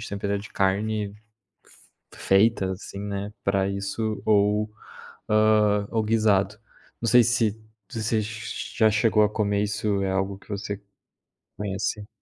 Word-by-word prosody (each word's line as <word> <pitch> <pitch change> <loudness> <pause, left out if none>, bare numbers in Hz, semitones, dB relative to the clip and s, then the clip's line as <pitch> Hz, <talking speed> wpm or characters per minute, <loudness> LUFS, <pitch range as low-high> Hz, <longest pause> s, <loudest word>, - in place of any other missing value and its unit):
sempre 100 0 -5
era 100 - 0
de 100 - -9
carne 100 +1 0 1.0
f - - -15
feita, 95 -1 +3
assim, 100 +1 -9
né, 100 0 -4
pra 100 0 +2
isso 100 +2 -3
ou, 105 0 +3 0.6
hã, 105 -1 +3
ou 110 -1 +1
guisado. 105 -2 +2 0.4
Não 115 - -1
sei 125 0 +7
você 110 -1 -1
já 110 0 -1
chegou 105 0 +3
a 105 - +3
comer 105 -1 0
isso, 105 -1 -1
é 95 - 0
algo 95 +1 -1
que - - -22
você 100 0 -4 0.8
conhece? 105 +1 -3
105 Hz, 135 wpm, -25 LUFS, 100-110 Hz, 1.0 s, sei